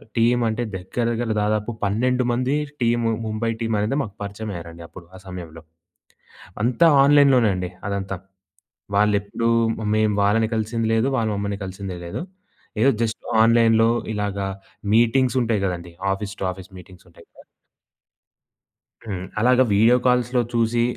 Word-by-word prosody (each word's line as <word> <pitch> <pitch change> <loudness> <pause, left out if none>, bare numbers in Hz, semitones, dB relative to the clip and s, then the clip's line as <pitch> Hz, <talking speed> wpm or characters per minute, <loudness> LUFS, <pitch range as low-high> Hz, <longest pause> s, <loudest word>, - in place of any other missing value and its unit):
టీమంటే 115 0 +1
దగ్గర, 95 +6 -4
దగ్గర్ల 115 -1 -1
దాదాపు 105 +2 -1
12 125 +5 +1
మంది 130 +4 0 0.3
టీము 115 -1 +1
ముంబై 110 +1 -2
టీమనేది 115 +2 -1
మాకు 105 -7 -6
పరిచమయ్యారండి 90 -5 -7
అప్పుడు 85 -1 -13
ఆ - - -11
సమయంలో. 85 -3 -9 1.0
అంతా 130 +8 +4 0.2
ఆన్‌లైన్‌లోనే 140 -6 +5
అండి 90 -1 -3 0.2
అదంతా. 95 -1 -3 0.8
వాళ్ళెప్పుడూ 105 +2 +1 0.5
మేం 110 -1 +2
వాళ్ళని 110 +2 +2
కలిసింది 110 +1 -1
లేదు. 115 +4 +2
వాళ్ళ 110 -1 0
మమ్మల్ని 100 0 -3
కలిసిందే 95 -1 -6
లేదు. 85 - -5 0.6
ఏదో 135 - +5
జస్ట్ 110 -1 -4 0.2
ఆన్‌లైన్‌లో 115 -1 +4 0.3
ఇలాగా 100 -1 -2 0.5
మీటింగ్సుంటాయి 120 -2 +2
గదండీ. 85 -1 -6 0.2
ఆఫీస్ 100 +1 -6
టు 95 - 0
ఆఫీస్ 95 +1 -13
మీటింగ్సుంటాయి 90 -1 -17
గద! - - -17 1.6
హ్మ్. 95 -3 -5
అలాగా 125 +2 +4
వీడియో 115 +4 +5
కాల్స్‌లో 125 0 +2
చూసి 115 0 +2
110 Hz, 125 wpm, -22 LUFS, 100-120 Hz, 1.6 s, ఆన్‌లైన్‌లోనే